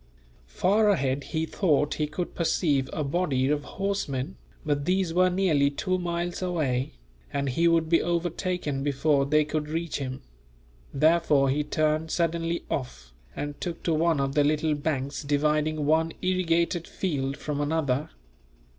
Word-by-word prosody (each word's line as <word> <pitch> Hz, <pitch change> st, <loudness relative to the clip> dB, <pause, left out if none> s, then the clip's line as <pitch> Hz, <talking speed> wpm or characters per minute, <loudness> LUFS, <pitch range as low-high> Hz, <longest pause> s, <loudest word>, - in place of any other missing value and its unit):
Far 205 Hz, -, +2 dB
ahead 140 Hz, -7 st, +1 dB
he 160 Hz, -1 st, -2 dB
thought 150 Hz, -5 st, +1 dB
he 150 Hz, -, -1 dB
could 170 Hz, +4 st, -4 dB
perceive 150 Hz, -5 st, +1 dB
a 155 Hz, -, -2 dB
body 140 Hz, -3 st, 0 dB
of 145 Hz, 0 st, 0 dB
horsemen, 190 Hz, -7 st, -3 dB, 0.3 s
but 145 Hz, -2 st, 0 dB
these 185 Hz, -1 st, +1 dB
were 185 Hz, +1 st, +4 dB
nearly 175 Hz, -7 st, +2 dB
two 185 Hz, +6 st, -1 dB
miles 175 Hz, 0 st, -3 dB
away, 150 Hz, -8 st, -1 dB, 0.4 s
and 140 Hz, -1 st, -1 dB
he 165 Hz, +7 st, +2 dB
would 165 Hz, -1 st, +3 dB
be 165 Hz, +1 st, +3 dB
overtaken 175 Hz, -3 st, -1 dB
before 140 Hz, 0 st, +1 dB
they 150 Hz, +1 st, +3 dB
could 150 Hz, 0 st, -2 dB
reach 165 Hz, +1 st, -2 dB
him; 130 Hz, -1 st, -5 dB, 0.7 s
therefore 150 Hz, -2 st, +3 dB
he 150 Hz, +2 st, 0 dB
turned 155 Hz, +1 st, 0 dB
suddenly 170 Hz, 0 st, -1 dB
off, 70 Hz, -, -5 dB, 0.2 s
and 145 Hz, 0 st, -5 dB
took 175 Hz, -2 st, -4 dB
to 165 Hz, -, +1 dB
one 160 Hz, -1 st, +2 dB
of 135 Hz, 0 st, 0 dB
the 145 Hz, -, +3 dB
little 155 Hz, +1 st, +1 dB
banks 145 Hz, -2 st, -2 dB
dividing 150 Hz, +1 st, +1 dB
one 160 Hz, +2 st, +2 dB
irrigated 170 Hz, -2 st, +1 dB
field 140 Hz, -6 st, -2 dB
from 145 Hz, 0 st, -3 dB
another. 145 Hz, -2 st, 0 dB
155 Hz, 150 wpm, -27 LUFS, 140-170 Hz, 0.7 s, were